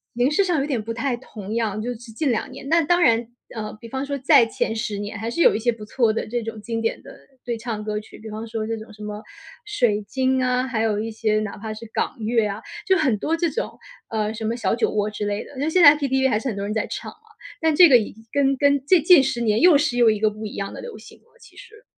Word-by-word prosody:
形 245 +4 +2
式 390 +6 +2
上 345 -6 +1
有 275 - -1
点 260 -7 -1
不 225 +2 -5
太 240 +1 -1
同 215 -4 -8
样， 215 -2 -1
就 245 - -3
是 245 - -5 0.2
近 275 +4 -1
2 225 - -1
年。 270 +1 -9
那 335 +1 +4
当 350 +4 +2
然， 230 -3 +3 0.3
呃， 215 -2 -5
比 230 - -10
方 265 +3 -4
说 280 0 -2
在 270 -3 +5
前 225 0 -2
10 215 -1 -3
年 205 0 -5
还 225 +2 -4
是 335 - -3
有 - - +5
一 - - -1
些 240 +2 +1
不 215 -2 -10
错 225 0 +1
的 225 - -3
这 240 +1 -2
种 220 -1 -7
经 230 0 -3
典 225 0 -2
的 - - -13 0.3
对 235 -2 -3
唱 220 -2 -4
歌 210 0 -3
曲， 215 - -11
比 220 - -9
方 220 +2 -6
说 220 -1 -4
这 225 +1 -3
种 220 0 -11
什 210 - -13
么 210 0 -5 0.5
《水 240 - +1
晶》 260 0 0
啊， 250 +1 0
还 225 -3 -1
有 210 -2 0
一 225 +1 -3
些 215 -1 0
哪 215 -2 -5
怕 215 +1 -6
是 220 - -9
港 - - -2
乐 225 0 +1
啊， 205 +2 -5 0.2
就 380 0 +4
很 265 -10 +1
多 320 +9 0
这 330 -1 0
种， - - -4 0.3
呃， 215 -1 -1
什 220 0 -6
么 225 +2 0
《小 235 - 0
酒 - - +1
窝》 210 0 0
之 210 0 -4
类 205 0 -2
的， 280 - -14
那 290 +3 0
现 355 +2 +3
在 295 0 +9
KTV 265 -2 +1
还 210 - +2
是 270 - -8
很 210 - -3
多 200 - -3
人 205 - -3
在 220 - -1
唱 - - -6
嘛。 - - -20 0.4
但 320 -1 +2
这 350 +1 +8
个 250 -3 +7
已 215 - -4
经 225 +1 -18
跟 275 -1 +2
跟 285 0 +2
这 355 +1 +5
近 340 -1 +7
10 245 -2 -2
年 220 -2 +1
又 345 -4 +7
是 280 -4 +1
又 235 - +6
一 215 - 0
个 215 - +3
不 215 +1 -7
一 - - -7
样 195 0 -4
的 - - -8
流 480 - -8
行 - - -14
了， 470 - -30
其 - - -18
实。 445 -2 -14
230 Hz, 305 characters per minute, -22 LUFS, 215-275 Hz, 0.5 s, 在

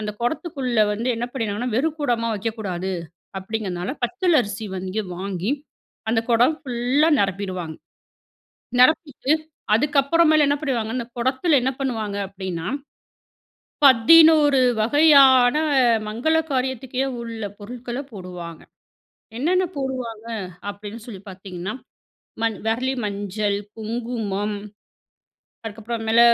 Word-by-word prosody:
அந்த 210 0 -3
குடத்துக்குள்ள 255 -4 -1
வந்து 230 +4 -2
என்ன 235 +1 -2
பண்ணிருவாங்கன்னா, 230 -1 -2
வெறும் 315 +4 0
குடமா 235 -5 0
வைக்கக்கூடாது 200 -4 -3 0.5
அப்பிடிங்கிறதுனால, 190 0 -4
பச்சலரிசி 240 - 0
வந்து 185 +3 -3 0.2
வாங்கி, 190 +2 -3 0.6
அந்த 225 0 +2
குடம் 245 +7 +4
ஃபுல்லா 260 +4 +1
நிரப்பிடுவாங்க. 185 -4 -3 1.0
நிரப்பிட்டு, 300 0 +3 0.4
அதுக்கப்புறமேலு 300 +4 +3
என்ன 285 - +2
பண்ணிடுவாங்க? 235 -7 -1
இந்த 235 - -4
குடத்தில 265 +5 +2
என்ன 265 +1 +1
பண்ணுவாங்க 220 -6 -2
அப்பிடின்னா, 185 -4 -5 1.2
11 290 +2 +7 0.2
வகையான 270 -1 +6 0.5
மங்கள 250 +10 +1 0.2
காரியத்துக்கே 260 0 -1 0.2
உள்ள 230 -2 -6
பொருட்கள 240 +4 -7
போடுவாங்க. 180 -4 -8 0.8
என்னென்ன 360 +7 +2
போடுவாங்க 260 -3 -3 0.6
அப்பிடின்னு 205 +2 -8
சொல்லி 200 -6 -8
பார்த்தீங்கன்னா, 190 +1 -6 0.7
மண் 225 -2 0
விரலி 255 +4 0
மஞ்சள், 205 0 -2 0.2
குங்குமம். 220 -3 -3 1.1
அதுக்கப்புற 225 +2 -5
மேல 225 +1 +5
230 Hz, 100 wpm, -22 LUFS, 205-265 Hz, 1.2 s, 11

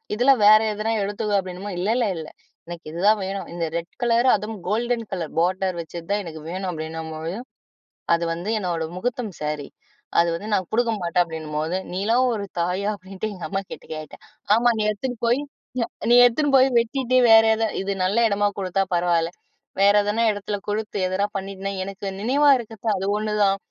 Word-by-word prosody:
இதுல 250 +5 +5
வேற 215 +1 +9
எதனா 215 +2 -2
எடுத்துக்கோ" 205 +1 -2
அப்படினுமா, 185 +2 -6
"இல்ல, 190 +4 -1
இல்ல, 240 -3 +2
இல்ல 160 -1 -6 0.4
எனக்கு 170 -2 -8
இதுதான் 205 +6 +3
வேணும். 195 -1 -4
இந்த 170 -1 -2
ரெட் 170 +1 -5
கலர், 240 +1 +3
அதுவும் 210 +1 -5
கோல்டன் 230 +3 0
கலர் 175 -5 -4
போடர் 185 +1 0
வச்ச 170 +1 -8
தான் 205 +1 +1
எனக்கு 160 -3 -8
வேணும்" 185 +2 -3
அப்படின்னும்போது, 160 +1 -5 0.8
"அது 170 0 +1
வந்து 175 +5 -5
என்னோட 170 -4 -2
முஹூர்த்தம் 230 +1 -3
ஸேரி. 150 -1 -3 0.5
அது 170 - +4
வந்து 200 +6 -6
நான் 185 -3 +1
குடுக்க 235 +1 +2
மாட்டேன்" 175 +1 +2
அப்படின்னும்போது, 160 +1 -3 0.2
"நீலாம் 225 +7 +2
ஒரு 205 -2 -3 0.2
தாயா?" 185 +4 -1
அப்படின்ட்டு 195 +2 -6
எங்க 180 - -7
அம்மாகிட்ட 195 -1 -5
கேட்டேன். 155 -1 -9 0.3
"ஆமா 240 +2 +4
நீ - - +1
எடுத்துன்னு 245 +3 -5
போய் 245 +4 +2 0.4
ய - - +2 0.2
நீ 240 - +7
எடுத்துன்னு 280 +4 +2
போய், 260 0 +6
வெட்டிட்டு 255 +2 0
வேற 225 0 +9
எத 225 - -1 0.2
இது 200 +1 -1
நல்ல 195 +4 0
எடமா 205 0 +2
குடுத்தா 195 0 0
பரவால்ல. 170 -1 +2 0.5
வேற 200 +1 +6
எதனா 210 +3 0
எடத்தில 205 0 -4
குடுத்து, 210 0 -3
எதனா 185 +2 0
பண்ணிட்டன்னா, 195 0 -5
எனக்கு 195 +1 -6
நினைவா 275 +7 +3
இருக்கிறது 225 -2 -8
அது 190 - -3
ஒண்ணு 215 0 -2
தான். 195 0 +3
195 Hz, 175 wpm, -23 LUFS, 175-220 Hz, 0.8 s, வேற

